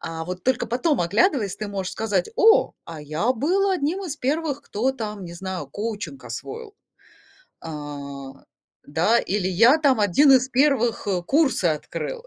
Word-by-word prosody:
А 160 Hz, 0 st, -5 dB
вот 180 Hz, +1 st, -7 dB
только 255 Hz, -2 st, +1 dB
потом, 255 Hz, +5 st, 0 dB
оглядываясь, 210 Hz, -, +1 dB
ты 215 Hz, -, -5 dB
можешь 195 Hz, -2 st, -4 dB
сказать: 205 Hz, -5 st, -1 dB
"О, 450 Hz, -2 st, +5 dB
а 165 Hz, -2 st, -9 dB
я 155 Hz, -, 0 dB
был 365 Hz, -, +1 dB
одним 360 Hz, +2 st, -1 dB
из 310 Hz, -5 st, -5 dB
первых, 290 Hz, +1 st, -2 dB
кто, 250 Hz, +6 st, -1 dB
там, 210 Hz, -6 st, -6 dB
не 170 Hz, -, -8 dB
знаю, 185 Hz, -3 st, -5 dB
коучинг 215 Hz, -, -6 dB
освоил". 445 Hz, -2 st, -7 dB, 0.9 s
А, 145 Hz, -3 st, -7 dB, 0.6 s
да, 170 Hz, +11 st, +2 dB
или: 190 Hz, -1 st, -1 dB
"Я, 230 Hz, -, +5 dB
там, 275 Hz, -6 st, +3 dB
один 240 Hz, +9 st, +5 dB
из 260 Hz, 0 st, +3 dB
первых 255 Hz, -5 st, +1 dB, 0.2 s
курсы 280 Hz, -, +2 dB
открыл". 170 Hz, -, -3 dB
225 Hz, 150 wpm, -23 LUFS, 180-285 Hz, 0.9 s, О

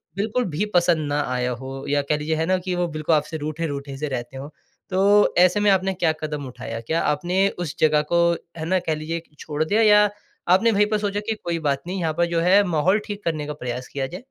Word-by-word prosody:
बिल्कुल 220 Hz, +5 st, -1 dB
भी 175 Hz, +7 st, -1 dB
पसंद 170 Hz, -3 st, +3 dB
ना 145 Hz, 0 st, 0 dB
आया 125 Hz, 0 st, -1 dB
हो 135 Hz, +1 st, -7 dB
या 145 Hz, 0 st, +2 dB
कह 145 Hz, +2 st, 0 dB
लीजिए 155 Hz, +2 st, -1 dB
है 160 Hz, +1 st, 0 dB
ना 185 Hz, +2 st, +2 dB
कि 180 Hz, 0 st, -3 dB
वो 175 Hz, 0 st, 0 dB
बिल्कुल 155 Hz, 0 st, 0 dB
आपसे 155 Hz, +2 st, -1 dB
रूठे-रूठे 145 Hz, -2 st, -4 dB
से 150 Hz, +2 st, -3 dB
रहते 130 Hz, -1 st, -5 dB
हों, 140 Hz, +2 st, -7 dB, 0.4 s
तो 200 Hz, +2 st, +4 dB
ऐसे 180 Hz, +3 st, +5 dB
में 205 Hz, -, +3 dB
आपने 190 Hz, 0 st, +2 dB
क्या 170 Hz, -3 st, +1 dB
कदम 150 Hz, -2 st, -4 dB
उठाया? 125 Hz, -, -6 dB
क्या 160 Hz, +8 st, -1 dB
आपने 175 Hz, +6 st, +1 dB
उस 175 Hz, -6 st, -5 dB
जगह 155 Hz, -1 st, +4 dB
को 170 Hz, -, +4 dB, 0.4 s
है 160 Hz, -, -4 dB
ना 185 Hz, +2 st, +2 dB
कह 165 Hz, -3 st, -2 dB
लीजिए 160 Hz, +2 st, -4 dB, 0.2 s
छोड़ 150 Hz, 0 st, -2 dB
दिया 210 Hz, +8 st, +1 dB
या 210 Hz, -1 st, +6 dB, 0.4 s
आपने 190 Hz, +6 st, +4 dB
वही 210 Hz, -1 st, +3 dB
पे 215 Hz, 0 st, 0 dB
सोचा 205 Hz, -1 st, -2 dB
कि 220 Hz, -, 0 dB
कोई 170 Hz, -1 st, -2 dB
बात 140 Hz, -3 st, 0 dB
नहीं 185 Hz, +1 st, -3 dB
यहाँ 160 Hz, -3 st, -1 dB
पर 175 Hz, -, +3 dB
जो 170 Hz, -, +1 dB
है 190 Hz, +4 st, +5 dB
माहौल 175 Hz, +5 st, +2 dB
ठीक 205 Hz, -1 st, -6 dB
करने 155 Hz, -3 st, -2 dB
का 150 Hz, -, -3 dB
प्रयास 125 Hz, -3 st, -5 dB
किया 135 Hz, -1 st, -3 dB
जाए? 180 Hz, +8 st, -8 dB
165 Hz, 240 wpm, -23 LUFS, 150-190 Hz, 0.4 s, या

